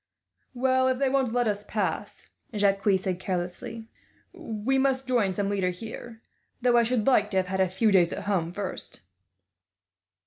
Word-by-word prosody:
"Well, 260 +1 +2
if 260 -1 +1
they 275 0 +1
won't 265 -3 +1
let 245 0 +1
us 205 -1 -1
pass," 210 0 -3 0.3
Jacques 200 -1 +2 0.2
said 185 -1 -3
carelessly, 185 +5 -4 0.5
"we 265 - -1
must 265 -1 +1
join 220 -7 +1
some 200 0 -1
leader 195 -2 0
here; 225 +4 -8 0.4
though 245 -1 +3
I - - +6
should 235 -1 0
like 215 -6 +4
to 195 - -1
have 185 - +2
had 190 0 0
a 190 - +2
few 210 +4 +2
days 180 -3 +4
at - - -4
home, 180 -5 0
first." 195 +1 -6
215 Hz, 170 wpm, -27 LUFS, 190-250 Hz, 0.5 s, I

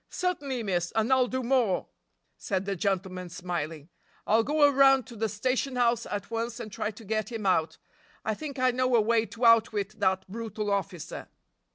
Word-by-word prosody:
"Certainly, 285 -9 -2
miss, 175 -4 -1
and 225 +4 +2
I'll 255 -1 +4
do 260 +1 -3
more," 240 -6 +2 0.5
said 190 -1 -2
the 200 0 -2
gentleman 185 -1 -2
smiling; 165 -3 -5 0.4
"I'll 220 +2 +4
go 295 +5 +1
around 270 -2 +5
to 235 - -11
the 220 0 -1
station 255 +5 -1
house 240 -2 +2
at 200 +1 -5
once 230 +1 -3
and 220 -3 -7
try 210 - -2
to 220 +1 -11
get 215 +3 -2
him 225 -3 -5
out. 165 -4 +1 0.5
I 220 - +1
think 280 +4 -7
I 255 0 +3
know 255 0 +1
a - - +6
way 225 +1 +2
to 235 +1 -3
outwit 215 -3 +3
that 190 0 +1
brutal 215 0 -4
officer." 195 -4 -3
220 Hz, 185 wpm, -28 LUFS, 195-250 Hz, 0.5 s, a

